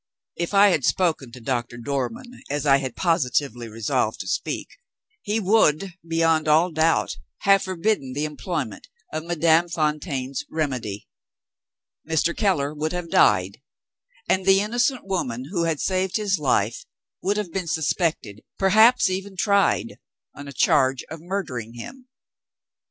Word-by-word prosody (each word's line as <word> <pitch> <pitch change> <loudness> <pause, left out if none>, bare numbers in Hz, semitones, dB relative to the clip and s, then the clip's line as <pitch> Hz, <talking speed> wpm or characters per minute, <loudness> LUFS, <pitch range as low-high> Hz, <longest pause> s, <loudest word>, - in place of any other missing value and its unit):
If 170 +4 -3
I 200 +1 +7
had 160 -7 +1
spoken 160 -8 0
to 125 - -11
Doctor 120 -1 -3
Dormann 135 - -4
as 145 +1 -2
I 135 -1 +6
had 130 -3 -5
positively 135 -8 0
resolved 110 -1 -1
to - - -8
speak, - - -4 0.4
he 210 +2 -1
would, 195 -4 +2
beyond 165 -1 +1
all 160 +4 +4
doubt, 160 +1 +1 0.2
have 195 -1 +5
forbidden 185 -7 -1
the 145 +3 -1
employment 150 - -5 0.3
of 155 +1 -4
Madame 170 0 +3
Fontaine's 150 -5 -2
remedy; 130 -10 -3 1.0
Mr. 160 +1 0
Keller 150 -9 +1
would 155 +2 -3
have 175 -2 -5
died; 100 +1 +3 0.7
and 190 0 +1
the 195 0 +6
innocent 240 +4 0
woman 130 -9 -3
who 170 -4 0
had 160 -3 -1
saved 185 0 0
his 200 -4 0
life 120 -3 0 0.4
would 200 +2 0
have 205 -5 -3
been 185 -3 -3
suspected, 155 - -1 0.2
perhaps 215 +6 +5
even 190 +1 -4
tried, 200 0 +1 0.3
on 145 0 -10
a - - -7
charge 130 -1 +2
of 160 -1 -7
murdering 130 - -4
him. 250 - -10
160 Hz, 140 wpm, -23 LUFS, 135-190 Hz, 1.0 s, I